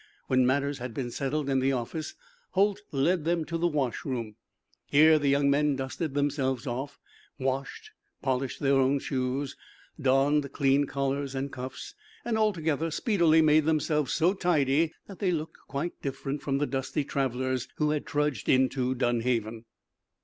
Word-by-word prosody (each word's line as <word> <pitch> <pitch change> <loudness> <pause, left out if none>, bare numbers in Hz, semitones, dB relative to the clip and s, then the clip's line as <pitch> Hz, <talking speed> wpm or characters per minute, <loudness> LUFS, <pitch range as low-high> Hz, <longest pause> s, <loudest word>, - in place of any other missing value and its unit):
When 130 -1 +3
matters 140 +1 0
had 125 -2 -6
been 125 -3 -3
settled 140 +3 -2
in 135 -1 +2
the 135 +1 +2
office 135 +6 -4 0.4
Holt 200 +1 +2
led 155 +5 +1
them 165 0 0
to 165 - -5
the 170 +1 +2
wash 145 -7 -1
room. 115 -6 -4 0.5
Here 155 +2 +6
the 145 - 0
young 140 0 +3
men 145 0 +2
dusted 135 +3 -4
themselves 140 -3 0
off, 135 +3 -4 0.4
washed, 135 - -3 0.3
polished 130 -1 -2
their 140 -1 +3
own 135 +1 +3
shoes, 135 0 -2 0.5
donned 140 +1 +2
clean 140 0 +2
collars 140 0 -2
and 135 +1 -3
cuffs, 130 +1 -7 0.3
and, 235 - 0
altogether, 165 -8 +1
speedily 165 -3 +3
made 155 0 +4
themselves 150 -3 +1
so 175 +3 +3
tidy 160 -4 +2
that 195 - -11
they 195 - +1
looked 160 -2 -3
quite 145 +5 -4
different 135 +1 -4
from 135 -1 -1
the 145 - +1
dusty 135 +1 -2
travelers 130 -2 -1
who 150 -1 +1
had 150 -1 -2
trudged 145 -6 -1
into 130 0 +2
Dunhaven. 115 -2 -1
140 Hz, 155 wpm, -28 LUFS, 130-155 Hz, 0.5 s, Here